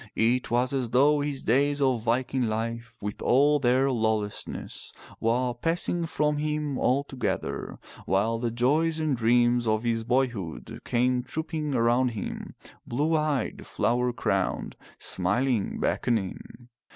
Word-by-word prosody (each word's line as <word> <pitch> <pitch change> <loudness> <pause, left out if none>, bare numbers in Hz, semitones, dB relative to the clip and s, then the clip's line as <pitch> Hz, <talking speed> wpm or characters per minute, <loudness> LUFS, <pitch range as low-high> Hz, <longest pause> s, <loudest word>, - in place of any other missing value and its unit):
It 120 +3 +1
was 125 +3 +1
as 130 -4 -1
though 145 +5 +4
his 145 -2 -3
days 140 +5 +2
of 130 -4 +2
Viking 125 +2 0
life 115 +1 -4
with 105 0 -5
all 145 +4 +4
their 130 +1 +3
lawlessness 110 -3 -2 0.3
were 120 +2 +1
passing 165 +5 0
from 150 -1 0
him 150 -2 -2
altogether, 135 +1 -1 0.3
while 110 +4 +1
the 120 0 -1
joys 150 +8 +1
and 155 -3 +1
dreams 120 0 +3
of 110 +1 +1
his 115 -1 0
boyhood 120 -8 -2
came 125 +1 +1
trooping 150 +3 -3
around 120 +2 +3
him, - - -6 0.3
blue 150 +7 +1
eyed, 150 -3 -1
flower 125 +1 +1
crowned, - - -1 0.2
smiling, 105 +4 0
beckoning. 115 +2 -2
125 Hz, 125 wpm, -27 LUFS, 115-140 Hz, 0.3 s, though